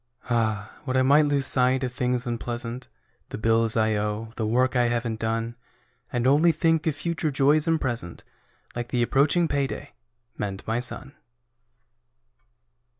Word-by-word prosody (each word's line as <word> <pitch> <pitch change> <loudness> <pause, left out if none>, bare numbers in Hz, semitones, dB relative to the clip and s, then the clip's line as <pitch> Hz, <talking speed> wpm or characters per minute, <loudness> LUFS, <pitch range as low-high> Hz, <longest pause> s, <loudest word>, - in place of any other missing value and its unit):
Ah, 110 -3 -1
would 130 0 0
I 130 - +4
might 145 +3 +5
lose 140 -2 +1
sight 130 0 +2
of 125 -1 -3
things 125 0 -1
unpleasant: 120 +1 -4 0.4
The - - -6
bills 115 +1 +2
I 110 0 +2
owe; 105 +2 -3
the 110 -2 -2
work 125 +3 +1
I 125 -1 +3
haven't 115 -2 -2
done. 115 +1 -2 0.6
And 120 -1 -1
only 150 +6 +5
think 165 -1 +1
of 155 - +1
future 165 +1 -2
joys 145 +3 +4
and 165 -1 +2
present, 120 - -4 0.5
Like 120 0 -3
the 120 -1 0
approaching 145 +7 +2
payday, 140 -1 -3 0.5
and 100 -2 -4
my 115 +2 -1
son. 130 +2 -3
125 Hz, 150 wpm, -25 LUFS, 115-140 Hz, 0.6 s, might